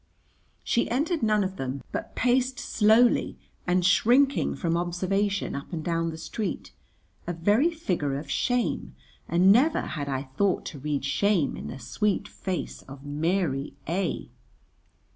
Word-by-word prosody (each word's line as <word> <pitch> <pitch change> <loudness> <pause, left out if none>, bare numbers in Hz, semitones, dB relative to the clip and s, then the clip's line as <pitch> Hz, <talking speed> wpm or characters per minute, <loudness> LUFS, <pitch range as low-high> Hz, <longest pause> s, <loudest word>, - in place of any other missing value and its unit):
She 235 - +1
entered 300 +6 0
none 215 -2 +3
of 190 0 -4
them, 135 +1 -4
but - - -5
paced 255 +1 +2
slowly 225 +2 +3 0.3
and 180 0 +2
shrinking 245 +9 +3
from 170 -2 -1
observation 190 +4 -1
up 140 0 -6
and 160 -3 -4
down 165 -1 0
the 160 - -6
street, 190 +3 -4 0.6
a 175 - -1
very 205 - +3
figure 175 - -2
of 145 +1 -7
shame; 245 - -1 0.3
and 180 +3 +5
never 275 +9 +4
had 145 -3 -4
I 135 0 -2
thought 160 +8 0
to 145 - -9
read 145 0 -2
shame 160 +2 +1
in - - -7
the - - -6
sweet 200 - -1
face 185 -3 -5
of 135 +1 -11
Mary 150 -1 -1
A 175 +3 -2
180 Hz, 145 wpm, -27 LUFS, 150-215 Hz, 0.6 s, and